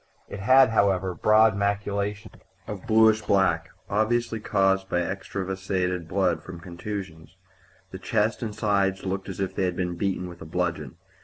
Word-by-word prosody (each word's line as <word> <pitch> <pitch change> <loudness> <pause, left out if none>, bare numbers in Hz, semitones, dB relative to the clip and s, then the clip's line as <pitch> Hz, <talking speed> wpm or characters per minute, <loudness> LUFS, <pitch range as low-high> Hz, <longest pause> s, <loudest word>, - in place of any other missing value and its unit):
It 100 - -7
had, 130 +5 +6
however, 95 -4 +2
broad 110 +4 +4
maculations 100 +1 -2 0.3
of 100 -3 -7
bluish 110 0 +5
black, 100 -2 +1 0.2
obviously 115 +2 0
caused 95 -2 +1
by 90 - +1
extravasated 95 -1 -3
blood 90 -3 0
from 85 +1 -9
contusions. 90 -1 -7 0.6
The 95 - -7
chest 105 +3 0
and 110 -3 -4
sides 100 -2 0
looked 95 +1 -3
as 95 - -7
if 95 -1 -2
they 95 - 0
had 90 -1 -1
been 90 -1 -2
beaten 95 -1 -1
with 85 -1 -11
a - - -7
bludgeon. 80 -4 -3
95 Hz, 155 wpm, -25 LUFS, 90-105 Hz, 0.6 s, had